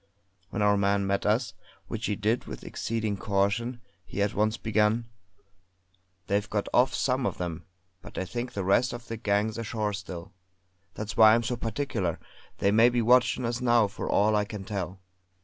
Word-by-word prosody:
When 105 Hz, -, -1 dB
our 105 Hz, 0 st, +4 dB
man 100 Hz, 0 st, +2 dB
met 100 Hz, +1 st, 0 dB
us, 115 Hz, +2 st, +1 dB, 0.3 s
which 115 Hz, 0 st, -3 dB
he 105 Hz, -, 0 dB
did 110 Hz, +5 st, 0 dB
with -, -, -8 dB
exceeding 110 Hz, -3 st, -2 dB
caution, 105 Hz, +5 st, 0 dB, 0.2 s
he 95 Hz, +2 st, -2 dB
at 100 Hz, -, -1 dB
once 110 Hz, +2 st, +1 dB
began: 110 Hz, +1 st, +1 dB, 1.2 s
"They've 100 Hz, +1 st, 0 dB
got 105 Hz, -1 st, -1 dB
off, 125 Hz, +2 st, +4 dB
some 130 Hz, -1 st, +1 dB
of -, -, -3 dB
them; 85 Hz, -3 st, -4 dB, 0.4 s
but -, -, -12 dB
I 95 Hz, -, -1 dB
think 120 Hz, +5 st, -5 dB
the 100 Hz, -, -2 dB
rest 100 Hz, +7 st, +2 dB
of 120 Hz, 0 st, -8 dB
the 115 Hz, -, -5 dB
gang's 105 Hz, +1 st, 0 dB
ashore 110 Hz, -2 st, -2 dB
still. 95 Hz, -2 st, -7 dB, 0.6 s
That's 105 Hz, -1 st, -5 dB
why 110 Hz, 0 st, +8 dB
I'm 120 Hz, -, +1 dB
so 125 Hz, +1 st, -1 dB
particular; 115 Hz, -, -2 dB, 0.4 s
they 100 Hz, -, +2 dB
may 115 Hz, +3 st, +6 dB
be 120 Hz, -1 st, +1 dB
watchin' 125 Hz, +1 st, +4 dB
us 120 Hz, +1 st, -2 dB
now 120 Hz, -2 st, +4 dB
for 100 Hz, -, -5 dB
all 105 Hz, +1 st, +3 dB
I 105 Hz, -, +3 dB
can 105 Hz, -2 st, -7 dB
tell." 95 Hz, -2 st, -4 dB
105 Hz, 185 wpm, -28 LUFS, 100-115 Hz, 1.2 s, why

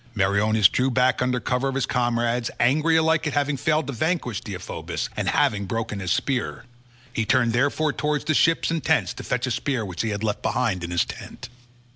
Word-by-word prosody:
Meriones 100 Hz, +1 st, +4 dB
drew 130 Hz, +7 st, 0 dB
back 125 Hz, 0 st, +2 dB
under 125 Hz, 0 st, +1 dB
cover 125 Hz, +2 st, -1 dB
of 135 Hz, -, -2 dB
his 135 Hz, -, +1 dB
comrades, 120 Hz, -1 st, 0 dB
angry 155 Hz, +7 st, +3 dB
alike 160 Hz, 0 st, +2 dB
at 150 Hz, -, -2 dB
having 145 Hz, 0 st, +1 dB
failed 155 Hz, +3 st, +1 dB
to 140 Hz, -, -4 dB
vanquish 125 Hz, -, -1 dB
Deiphobus, 95 Hz, -4 st, -5 dB
and -, -, -1 dB
having 100 Hz, -2 st, +1 dB
broken 110 Hz, 0 st, -3 dB
his 90 Hz, -4 st, -3 dB
spear. 130 Hz, +4 st, -1 dB, 0.5 s
He 115 Hz, -, 0 dB
turned 120 Hz, 0 st, +2 dB
therefore 145 Hz, +4 st, +1 dB
towards 150 Hz, -1 st, -1 dB
the 155 Hz, -, +1 dB
ships 165 Hz, +2 st, +3 dB
and 165 Hz, -2 st, -2 dB
tents 95 Hz, -7 st, +1 dB
to -, -, -9 dB
fetch 125 Hz, 0 st, -1 dB
a 130 Hz, -, -3 dB
spear 125 Hz, -1 st, -1 dB
which 90 Hz, -3 st, -4 dB
he 115 Hz, -, -1 dB
had 105 Hz, 0 st, -3 dB
left 105 Hz, -2 st, -1 dB
behind 115 Hz, -8 st, 0 dB
in 85 Hz, -, -4 dB
his 85 Hz, -1 st, +1 dB
tent. -, -, -9 dB
125 Hz, 205 wpm, -24 LUFS, 110-140 Hz, 0.5 s, Meriones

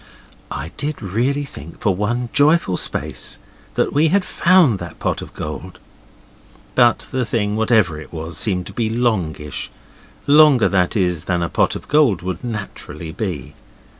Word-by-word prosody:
I 80 Hz, +5 st, -5 dB
did 150 Hz, 0 st, -3 dB
really 120 Hz, +8 st, -1 dB
think 80 Hz, -, -11 dB
for 100 Hz, -, +2 dB
one 120 Hz, +6 st, -1 dB
joyful 150 Hz, -, +3 dB
space -, -, -2 dB, 0.4 s
that -, -, +1 dB
we 150 Hz, +3 st, +4 dB
had 195 Hz, +4 st, +2 dB
found 170 Hz, -, +4 dB
that 85 Hz, -2 st, -8 dB
pot -, -, -2 dB
of -, -, -9 dB
gold. -, -, -6 dB, 1.0 s
But 120 Hz, -2 st, +3 dB
the 130 Hz, -1 st, 0 dB
thing, 105 Hz, -3 st, -1 dB
whatever 105 Hz, -8 st, +2 dB
it -, -, -12 dB
was, 80 Hz, 0 st, -6 dB
seemed 90 Hz, +3 st, 0 dB
to -, -, -9 dB
be 115 Hz, -2 st, -1 dB
longish; 95 Hz, -, -1 dB, 0.6 s
longer, 145 Hz, -4 st, +6 dB
that 95 Hz, +2 st, +1 dB
is, 90 Hz, -4 st, 0 dB
than 90 Hz, -2 st, 0 dB
a 85 Hz, -, -2 dB
pot -, -, +1 dB
of -, -, -8 dB
gold 140 Hz, -, +3 dB
would 90 Hz, -1 st, -4 dB
naturally 95 Hz, -8 st, -6 dB
be. 90 Hz, -, -4 dB
105 Hz, 160 wpm, -20 LUFS, 90-130 Hz, 1.0 s, longer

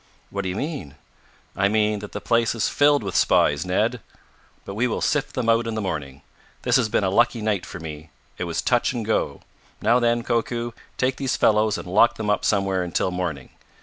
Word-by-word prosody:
"What 100 Hz, -, -2 dB
do 95 Hz, -, -3 dB
you 90 Hz, -, -3 dB
mean?" 140 Hz, -, -5 dB, 0.6 s
"I 95 Hz, -, +2 dB
mean 105 Hz, 0 st, +1 dB
that 105 Hz, 0 st, -8 dB
the -, -, -5 dB
place 115 Hz, 0 st, +1 dB
is 110 Hz, -, +1 dB
filled 145 Hz, -3 st, +3 dB
with 95 Hz, -2 st, -4 dB
spies, 75 Hz, +4 st, +3 dB
Ned! 90 Hz, -, 0 dB, 0.6 s
But 100 Hz, -, -6 dB
we 115 Hz, +5 st, +1 dB
will 115 Hz, -, -2 dB
sift 150 Hz, -2 st, 0 dB
them 125 Hz, -3 st, -1 dB
out 115 Hz, 0 st, +3 dB
in 115 Hz, -, -3 dB
the -, -, -1 dB
morning. 70 Hz, -9 st, -4 dB, 0.4 s
This -, -, +2 dB
has 110 Hz, -, +1 dB
been 105 Hz, -, +1 dB
a 95 Hz, -, +1 dB
lucky 120 Hz, +3 st, +3 dB
night 105 Hz, -4 st, -1 dB
for -, -, -8 dB
me. 80 Hz, -1 st, -8 dB, 0.3 s
It 90 Hz, -, -1 dB
was 85 Hz, -1 st, -2 dB
touch 120 Hz, +1 st, +2 dB
and 115 Hz, -3 st, -3 dB
go. 110 Hz, -, -1 dB, 0.4 s
Now, 115 Hz, +4 st, +3 dB
then, 120 Hz, -1 st, +1 dB
Koku, 120 Hz, 0 st, -1 dB, 0.3 s
take 130 Hz, 0 st, 0 dB
these 135 Hz, -2 st, -1 dB
fellows 105 Hz, 0 st, +3 dB
and -, -, -7 dB
lock 105 Hz, +6 st, +4 dB
them 105 Hz, -1 st, -1 dB
up 105 Hz, -, 0 dB
somewhere 95 Hz, -2 st, +1 dB
until 90 Hz, +1 st, -1 dB
morning. 85 Hz, -7 st, -4 dB
105 Hz, 215 wpm, -23 LUFS, 95-120 Hz, 0.6 s, lock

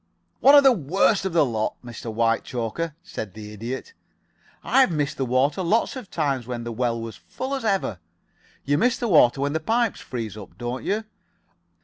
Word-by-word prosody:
'" -, -, -46 dB
"One 280 Hz, +2 st, +7 dB
of 285 Hz, -, +8 dB
the 270 Hz, -, +7 dB
worst 195 Hz, -, +2 dB
of 190 Hz, -, -2 dB
the 165 Hz, -3 st, +4 dB
lot, 110 Hz, -4 st, -2 dB
Mr. 120 Hz, -1 st, -7 dB
Whitechoker," 115 Hz, +6 st, -1 dB
said 105 Hz, -3 st, -7 dB
the 105 Hz, -1 st, -9 dB
Idiot. 120 Hz, -, -6 dB, 0.7 s
"I've 265 Hz, -4 st, +4 dB
missed 150 Hz, -4 st, -1 dB
the 135 Hz, -, -1 dB
water 135 Hz, +7 st, +2 dB
lots 215 Hz, +9 st, +1 dB
of 250 Hz, -7 st, -8 dB
times 135 Hz, -5 st, -1 dB
when 120 Hz, -2 st, -4 dB
the 120 Hz, -, -5 dB
well 115 Hz, 0 st, -1 dB
was 115 Hz, -1 st, -7 dB
full 265 Hz, +2 st, -6 dB
as 270 Hz, -, -2 dB
ever. 195 Hz, -, 0 dB, 0.7 s
You 145 Hz, +2 st, +2 dB
miss 250 Hz, +3 st, +2 dB
the 240 Hz, -, -2 dB
water 140 Hz, -, +5 dB
when 140 Hz, +1 st, 0 dB
the 160 Hz, -, 0 dB
pipes 225 Hz, +6 st, 0 dB
freeze 115 Hz, -5 st, -5 dB
up, 105 Hz, -3 st, -11 dB
don't 120 Hz, +1 st, -4 dB
you? 215 Hz, +2 st, -1 dB
140 Hz, 195 wpm, -24 LUFS, 115-195 Hz, 0.7 s, of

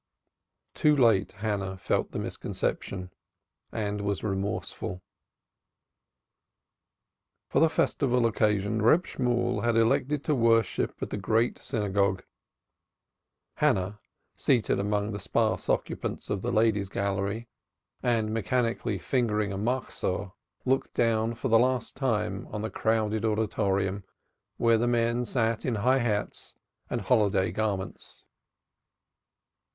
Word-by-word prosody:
Too 150 Hz, -1 st, +3 dB
late 115 Hz, -8 st, +4 dB
Hannah 100 Hz, -3 st, -3 dB
felt -, -, 0 dB
the -, -, -6 dB
misconception 90 Hz, -2 st, -3 dB, 0.6 s
and 105 Hz, -1 st, -2 dB
was 100 Hz, -1 st, -2 dB
remorseful. 95 Hz, -2 st, -3 dB, 2.5 s
For -, -, +2 dB
the 165 Hz, -, +5 dB
festival 125 Hz, -6 st, +1 dB
occasion 105 Hz, -1 st, +1 dB
Reb 160 Hz, +12 st, +4 dB
Shemuel 125 Hz, -3 st, 0 dB
elected 120 Hz, +5 st, +2 dB
to 155 Hz, -, +1 dB
worship 115 Hz, -3 st, +2 dB
at -, -, -5 dB
the -, -, -2 dB
Great 110 Hz, +4 st, +1 dB
Synagogue; 100 Hz, -2 st, 0 dB, 1.3 s
Hannah, 95 Hz, +3 st, +1 dB, 0.4 s
seated 125 Hz, -7 st, +2 dB
among 105 Hz, +1 st, 0 dB
the 100 Hz, -, -4 dB
sparse -, -, 0 dB
occupants -, -, -2 dB
of 100 Hz, -2 st, -1 dB
the 120 Hz, -, -2 dB
Ladies' 110 Hz, -3 st, +2 dB
Gallery 100 Hz, +4 st, -2 dB, 0.5 s
and 110 Hz, -3 st, +1 dB
mechanically 115 Hz, 0 st, 0 dB
fingering 105 Hz, -2 st, 0 dB
a -, -, -3 dB
Machzor, 105 Hz, -4 st, -2 dB, 0.3 s
looked 130 Hz, +1 st, 0 dB
down 115 Hz, 0 st, +1 dB
for 125 Hz, -, -3 dB
the 115 Hz, 0 st, +6 dB
last 125 Hz, -1 st, 0 dB
time 115 Hz, -6 st, -1 dB
on 105 Hz, 0 st, -5 dB
the 110 Hz, -, -3 dB
crowded 110 Hz, -1 st, 0 dB
auditorium 100 Hz, -3 st, 0 dB, 0.5 s
where 115 Hz, -1 st, +4 dB
the 120 Hz, -, +1 dB
men 120 Hz, 0 st, +1 dB
sat 115 Hz, -2 st, 0 dB
in 125 Hz, -, 0 dB
high 130 Hz, +6 st, +3 dB
hats 105 Hz, -4 st, -2 dB, 0.3 s
and 120 Hz, -, -2 dB
holiday 100 Hz, -4 st, +2 dB
garments. 100 Hz, -3 st, -4 dB
110 Hz, 115 wpm, -28 LUFS, 100-120 Hz, 2.5 s, the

